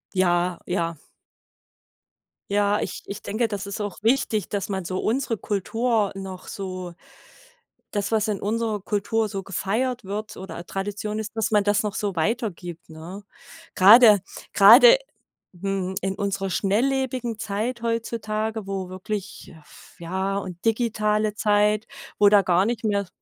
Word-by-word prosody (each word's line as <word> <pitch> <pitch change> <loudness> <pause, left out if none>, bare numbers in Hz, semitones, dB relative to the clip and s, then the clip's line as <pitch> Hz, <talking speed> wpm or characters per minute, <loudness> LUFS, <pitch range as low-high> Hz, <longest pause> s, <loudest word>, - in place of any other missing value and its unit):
Ja, 175 -1 +2
ja. 170 -2 -1 1.6
Ja, 205 0 +2
ich - - -5
ich 200 +1 -7
denke, 225 +3 -1
das 205 -2 -4
ist 200 +1 -5
auch 205 -3 -4
wichtig, 225 -4 +1
dass 200 -2 -3
man 190 -3 -3
so 185 +2 -3
unsere 235 -1 -1
Kultur 215 +2 0
noch 190 -1 -8
so 185 -2 -6 1.0
das, 205 0 -2
was 220 -1 +2
in 205 -3 -2
unserer 220 -1 -1
Kultur 210 +2 -1
so 195 -1 -5
gefeiert 225 +7 -2
wird 210 +2 -5
oder 185 -2 -8
Tradition 205 +3 -4
ist, 220 0 -6
dass 225 +1 -1
man 210 -1 +4
das 205 +1 +2
noch 210 -2 -3
so 200 -3 -2
weitergibt, 175 -3 -3
ne? 165 +6 -9 0.5
Grade 210 +1 +8 0.3
grade 240 - +9 0.6
mhm, 190 0 -3
in 195 0 -2
unserer 195 -1 -2
schnelllebigen 240 +4 0
Zeit 220 +3 -3
heutzutage, 220 -2 -2
wo 190 -2 -4
wirklich 195 +2 -6
f 150 - -18
ja, 190 +3 -2
und 185 -3 -6
digitale 215 -2 +1
Zeit, 210 +1 +2 0.3
wo 205 -1 +7
da 205 -1 +6
gar 185 0 +2
nicht 235 0 -2
mehr 200 -3 0
205 Hz, 140 wpm, -24 LUFS, 190-220 Hz, 1.6 s, grade